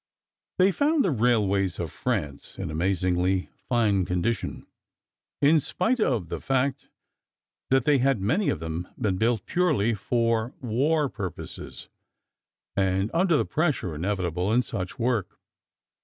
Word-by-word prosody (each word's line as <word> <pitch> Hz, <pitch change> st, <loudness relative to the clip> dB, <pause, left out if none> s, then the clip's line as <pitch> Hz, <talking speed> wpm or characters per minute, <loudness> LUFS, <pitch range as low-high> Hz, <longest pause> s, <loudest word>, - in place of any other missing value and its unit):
They 190 Hz, +1 st, +5 dB
found 295 Hz, -, +2 dB
the 185 Hz, -, +2 dB
railways 105 Hz, -, +2 dB
of 85 Hz, -3 st, -4 dB
France 70 Hz, -1 st, -3 dB
in -, -, -4 dB
amazingly 90 Hz, +2 st, 0 dB, 0.2 s
fine 110 Hz, -6 st, +2 dB
condition, 90 Hz, +5 st, -2 dB, 0.8 s
in 155 Hz, +3 st, +6 dB
spite 220 Hz, -, 0 dB
of 120 Hz, -, +1 dB
the -, -, -4 dB
fact 135 Hz, 0 st, -1 dB, 0.8 s
that 135 Hz, -2 st, +3 dB
they 145 Hz, -2 st, +4 dB
had, 135 Hz, -2 st, +2 dB
many 140 Hz, -, +1 dB
of -, -, -1 dB
them, 80 Hz, +2 st, -4 dB
been 95 Hz, -4 st, 0 dB
built 110 Hz, -1 st, +1 dB
purely 155 Hz, -, +2 dB
for 115 Hz, +2 st, 0 dB
war 140 Hz, +5 st, +1 dB, 0.3 s
uses, -, -, -9 dB, 0.9 s
and 95 Hz, +1 st, +1 dB
under 170 Hz, -1 st, +3 dB
the -, -, +1 dB
pressure 145 Hz, -, 0 dB
inevitable 90 Hz, +2 st, -1 dB
in 125 Hz, +3 st, +3 dB
such 95 Hz, -5 st, -5 dB
work. 115 Hz, -6 st, -1 dB
115 Hz, 130 wpm, -26 LUFS, 95-135 Hz, 0.9 s, in